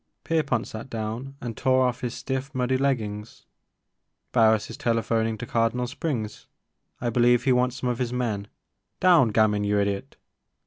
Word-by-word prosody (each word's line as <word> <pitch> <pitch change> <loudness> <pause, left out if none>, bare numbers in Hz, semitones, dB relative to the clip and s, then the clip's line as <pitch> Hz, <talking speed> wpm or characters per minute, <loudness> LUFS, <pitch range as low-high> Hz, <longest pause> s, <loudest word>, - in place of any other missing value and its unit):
Pierpont 145 -8 0
sat 110 +4 -8
down 115 +4 -5
and 115 -2 -5
tore 130 +1 +3
off 125 -1 -1
his 125 -1 -3
stiff 130 +2 -4
muddy 130 0 +1
leggings. 115 -6 -2 0.9
Barris 110 -3 +4
is - - -7
telephoning 115 -1 0
to - - -6
Cardinal 115 +2 0
Springs, 125 -5 -4 0.3
— - - -48
I 120 -1 -1
believe 120 +1 +4
he 135 - +3
wants 125 0 +2
some 130 -1 -2
of 120 - -4
his 125 -2 -1
men, 110 -5 -2 0.3
— - - -54
down! 175 -8 +6
Gamin, 105 -1 +3
you 105 0 +1
idiot 100 -1 -2
120 Hz, 170 wpm, -25 LUFS, 110-130 Hz, 0.9 s, down